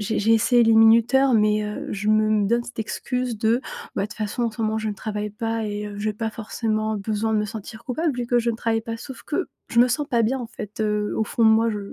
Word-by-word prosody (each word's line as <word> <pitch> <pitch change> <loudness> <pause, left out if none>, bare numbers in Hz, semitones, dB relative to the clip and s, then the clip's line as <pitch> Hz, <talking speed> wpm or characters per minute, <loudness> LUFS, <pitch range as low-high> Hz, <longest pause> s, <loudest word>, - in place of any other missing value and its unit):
j'ai 210 +1 -1
j'ai 225 +2 +3
essayé 240 +2 +4
les 225 0 +4
minuteurs, 230 +4 +5
mais 210 -1 +3
heu, 210 0 -5
je 205 +1 -3
me 215 -1 +3
donne 235 +1 +1
cette 245 - -11
excuse 250 +1 -3
de: 230 +3 +2 0.4
«Bah - - +1
de - - -5
toute 215 - -11
façon 215 +3 -2
en 230 - 0
ce 220 +1 -9
moment, 220 0 0
je 220 - -2
ne 210 - -3
travaille 210 0 -4
pas 225 +1 -3
et 210 0 -4
heu, 205 -1 -8
j'ai 215 +1 -1
pas 220 +1 -3
forcément 215 0 -2
besoin 215 +2 -1
de - - +3
me 210 - 0
sentir 220 +1 -8
coupable 290 +2 -1
vu 240 - -2
que 245 0 +2
je 235 0 0
ne 225 - -4
travaille 225 -1 0
pas!» 230 0 -5
sauf 260 +2 -9
que 355 +4 -2 0.2
je 235 - +4
me 245 - +6
sens 290 +4 -1
pas 235 -3 +2
bien 250 +5 +1
en 245 - -5
fait, 215 -2 -8
heu, 210 -1 0
au 220 - +1
fond 230 - 0
de - - +7
moi, 225 +1 +4
je 210 - -3
220 Hz, 275 wpm, -23 LUFS, 215-235 Hz, 0.4 s, de